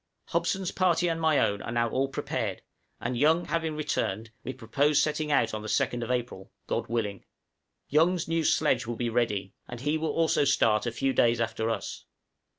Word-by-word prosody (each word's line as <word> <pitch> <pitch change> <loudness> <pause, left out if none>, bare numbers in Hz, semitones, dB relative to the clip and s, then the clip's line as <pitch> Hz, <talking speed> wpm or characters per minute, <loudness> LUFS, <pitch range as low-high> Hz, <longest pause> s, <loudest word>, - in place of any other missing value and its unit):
Hobson's 190 -2 0
party 175 -1 +2
and 165 -1 -1
my 160 -2 +3
own 100 -5 +1
are - - -5
now 120 0 +1
all 130 +4 0
prepared, 135 - -3 0.4
and 125 +1 -2
Young 160 +7 +3
having 165 -2 -1
returned, 115 -8 -2
we 130 - -3
propose 140 +4 +1
setting 150 +1 0
out 115 -6 +2
on 110 - -3
the 110 - -7
2d 120 +2 0
April 120 -6 -3
God - - -2
willing. 105 -4 -2 0.6
Young's 165 +3 +2
new 165 0 0
sledge 130 -6 +2
will 120 - -3
be 120 +1 -2
ready, 110 -5 -1
and 120 -1 -8
he 150 +3 0
will 160 0 -1
also 160 0 +2
start 115 -5 +3
a - - 0
few 135 +2 0
days 120 -1 +3
after 110 0 -1
us. 115 - -4
130 Hz, 185 wpm, -28 LUFS, 115-155 Hz, 0.6 s, my